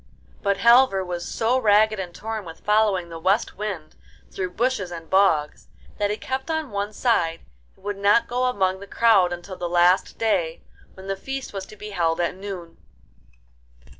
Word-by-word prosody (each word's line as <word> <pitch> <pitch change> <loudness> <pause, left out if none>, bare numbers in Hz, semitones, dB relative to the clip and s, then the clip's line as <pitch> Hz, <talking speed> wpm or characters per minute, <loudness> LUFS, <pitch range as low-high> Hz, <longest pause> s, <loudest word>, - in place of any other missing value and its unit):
But 200 -1 +1
Halvor 235 -3 +5
was 175 -1 -4
so 240 +3 +1
ragged 215 -1 +4
and 180 -2 -5
torn 220 +3 -5
with 165 -3 -11
following 210 -4 +2
the 165 -1 -7
West 190 +6 +1
Wind 195 -7 -5 0.4
through 185 -1 -3
bushes 235 -6 0
and 165 -2 -8
bogs 190 -6 +2 0.3
that 205 0 +1
he 210 - -2
kept 265 +6 -4
on 315 -5 -2
one 205 +1 -2
side, 175 -8 0 0.3
and - - -23
would 205 -1 -3
not 200 +3 +3
go 250 +1 0
among 190 -6 0
the 200 - -10
crowd 205 -7 +4
until 175 +2 -7
the 175 - -3
last 175 +2 +3
day, 185 -8 0 0.3
when 190 - -12
the 195 0 -2
feast 270 +6 -6
was 195 -1 -5
to - - -12
be 210 0 -9
held 165 -3 0
at 175 - 0
noon. 185 -4 -8
200 Hz, 180 wpm, -23 LUFS, 175-220 Hz, 0.4 s, Halvor